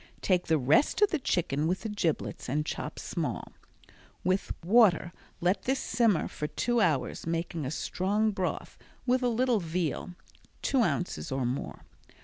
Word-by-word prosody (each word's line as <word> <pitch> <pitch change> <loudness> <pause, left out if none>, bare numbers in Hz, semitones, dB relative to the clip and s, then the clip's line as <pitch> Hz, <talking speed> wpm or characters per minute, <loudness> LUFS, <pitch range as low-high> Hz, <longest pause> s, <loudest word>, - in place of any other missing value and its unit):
Take 180 -2 +2
the 160 - +3
rest 145 - +3
of 415 - +4
the 320 - +1
chicken 155 - 0
with 185 +2 0
the 220 - -4
giblets 175 -10 -2
and 150 +4 0
chop - - -4
small. - - -3 0.7
With 185 +2 0
water 190 -5 +5 0.3
let 180 +3 +1
this 265 +1 +1
simmer 225 -8 +2
for 150 - -4
two 240 +8 0
hours, 150 -5 0
making 165 -3 -2
a - - -2
strong 200 +8 0
broth 190 -3 -3 0.3
with 255 0 +2
a 250 - +2
little 240 -1 +2
veal 170 0 -2 0.5
(two 270 -2 +2
ounces 180 -9 -1
or 130 -1 0
more). 125 +3 -3
180 Hz, 155 wpm, -29 LUFS, 160-225 Hz, 0.7 s, water